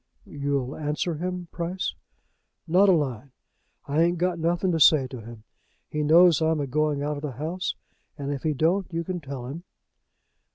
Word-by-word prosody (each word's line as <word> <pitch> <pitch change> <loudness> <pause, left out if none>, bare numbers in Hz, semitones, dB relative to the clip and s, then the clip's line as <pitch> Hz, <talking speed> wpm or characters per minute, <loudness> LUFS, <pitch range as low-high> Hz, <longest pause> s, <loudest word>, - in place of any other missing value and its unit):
"You'll 140 -2 -2
answer 155 +3 -2
him, 180 +2 -4
Price?" 175 +2 -3 0.7
"Not 185 +5 +5
a - - +8
line. 140 - -1 0.5
I 145 +3 +1
ain't 175 +1 +2
got 175 0 0
nothing 175 +3 +1
to 165 - 0
say 145 -2 +6
to 125 -2 -8
him. 115 0 -11 0.5
He 150 - -1
knows 165 +1 +6
I'm 160 -1 +2
a 145 - -1
going 145 +1 0
out 150 0 -2
of - - -7
the 150 -3 -4
house; 160 +8 -3 0.4
and 140 -1 -3
if 140 -2 -3
he 155 -2 0
don't, 180 +6 +1
you 165 0 -2
can 180 +1 -4
tell 135 -5 -7
him." 150 +7 -7
155 Hz, 180 wpm, -26 LUFS, 140-175 Hz, 0.7 s, a